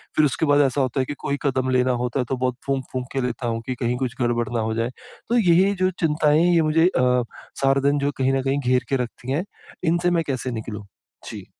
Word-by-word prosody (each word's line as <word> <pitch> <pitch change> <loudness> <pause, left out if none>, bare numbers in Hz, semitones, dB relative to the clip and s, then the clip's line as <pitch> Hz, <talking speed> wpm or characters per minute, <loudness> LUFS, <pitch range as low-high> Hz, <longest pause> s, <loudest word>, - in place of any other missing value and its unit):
फिर 155 - +4
उसके 145 +3 0
बाद 145 -1 +4
ऐसा 135 0 +1
होता 130 +1 -1
है 130 - +1
कि 145 - -4
कोई 140 - -2
कदम 130 -2 0
लेना 130 0 +2
होता 125 +2 -2
है, 125 - 0
तो 135 - -1
बहुत 125 0 -1
फूक-फूक 130 -2 -3
के 135 - 0
लेता 125 -1 -3
हूँ 115 0 -2
कि 130 - -3
कहीं 125 -1 -1
कुछ 125 -1 -3
गड़बड़ 120 -1 +1
ना 115 - 0
हो 110 0 -1
जाए। 115 +1 -1 0.4
तो 240 - +3
यही 180 -5 +5
है 200 +1 +2
जो 185 - +4
चिंताएँ 150 -1 +3
हैं, 175 0 +3
ये 165 - +4
मुझे 160 +2 +3
अ, 125 -7 +2 0.4
सारा 135 0 +3
दिन 145 0 +1
जो 140 +1 0
कहीं 135 0 +1
न 135 - +1
कहीं 135 +1 0
घेर 125 -1 +1
के 140 - +1
रखती 120 +2 -7
हैं। 155 +6 0 0.4
इनसे 175 +1 +2
मैं 170 -1 +1
कैसे 130 -2 -2
निकलूँ? 110 -2 -6 0.4
जी। - - -8
135 Hz, 255 wpm, -23 LUFS, 125-150 Hz, 0.4 s, यही